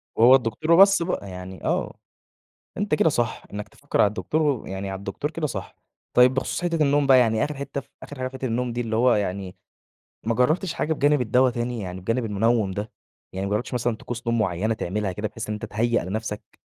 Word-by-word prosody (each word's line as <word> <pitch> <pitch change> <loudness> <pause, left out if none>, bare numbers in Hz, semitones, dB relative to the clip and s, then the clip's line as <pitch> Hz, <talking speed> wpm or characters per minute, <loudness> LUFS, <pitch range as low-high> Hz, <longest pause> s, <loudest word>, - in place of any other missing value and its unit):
وهو 120 +4 +7
الدكتور 125 +6 -1
وبَص 195 +1 +7
بقى 170 - -2
يعني 90 -1 -9
آه، - - -1 0.8
أنت 205 -5 0
كده 150 - +3
صح، 120 -6 -1
إنك 105 0 -5
تفكر - - -2
على - - +6
الدكتور 150 +9 -1
و 145 -6 +1
ويعني 95 +1 -5
على 95 - -4
الدكتور 100 +10 -4
كده 160 -1 -2
صح. - - -6 0.4
طيب 125 +1 +6
بخصوص 135 +6 -2
حِتّة 170 -2 +1
النوم 145 0 +3
بقى، 135 -1 +7
يعني 110 -3 +3
آخِر 150 - -4
حِتّة 140 0 -4
فآخِر 145 - -13
حاجة 130 0 -2
في - - -18
حِتّة 130 - -7
النوم 120 0 -1
دي 120 - -3
اللي 110 -2 -2
هو 125 +2 +4
يعني 95 -2 -3 0.7
ما 115 +1 +1
جربتش 155 - +1
حاجة 160 -1 -1
بجانب 145 -1 +2
الدّوا 125 +3 +3
تاني؟ 120 0 -3
يعني 90 -1 -6
بجانب 115 +5 -1
المُنوِّم 110 0 +1
ده، 105 +3 -5 0.4
يعني 95 +1 -3
ما - - -4
جربتش 105 +5 -2
مثلًا 120 -1 0
طقوس 120 +1 -7
نوم 115 0 +1
مُعيّنة 105 +2 0
تعملها 105 -1 -2
كده، 105 +4 -3
بحيث 110 +1 -7
إن 105 - -2
أنت 105 - -5
تهيَّأ 115 0 0
لنفسك؟ 105 +3 -5
115 Hz, 215 wpm, -24 LUFS, 105-135 Hz, 0.8 s, وهو